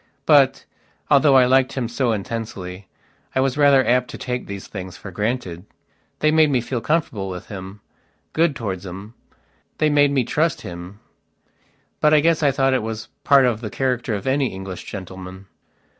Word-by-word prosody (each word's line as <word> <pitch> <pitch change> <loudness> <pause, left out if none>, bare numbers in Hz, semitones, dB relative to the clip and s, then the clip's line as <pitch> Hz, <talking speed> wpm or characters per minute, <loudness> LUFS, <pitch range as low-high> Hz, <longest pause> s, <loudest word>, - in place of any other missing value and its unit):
But, 140 -4 +4 0.5
although 140 -1 +5
I 130 -1 +7
liked 130 +1 +3
him 125 -4 -2
so 120 +1 0
intensely, 100 -3 -5 0.5
I - - +2
was 135 0 +1
rather 140 -2 +5
apt 125 0 +2
to - - -7
take 125 -1 -4
these 100 -1 -7
things 95 -3 -8
for 100 - -9
granted. 105 -3 -3 0.6
They 155 - +4
made 155 -1 +4
me 130 -3 +2
feel 120 0 -3
comfortable 115 -9 -1
with 90 -1 -8
him, 95 0 -8 0.5
good 160 -2 +2
towards 95 -6 -4
him; 95 +4 -9 0.6
they 155 -1 +2
made 145 -1 +4
me 135 -2 +1
trust 155 +6 0
him. 90 +3 -9 1.0
But 150 0 +4
I - - +6
guess 165 +1 +2
I 145 - +4
thought 135 0 +2
it 130 - +1
was 110 0 -5
part 140 -2 +5
of 120 -3 0
the 110 - -4
character 125 -2 -1
of 100 - -6
any 135 0 +1
English 95 -3 -7
gentleman. 95 0 -8
120 Hz, 175 wpm, -21 LUFS, 100-140 Hz, 1.0 s, I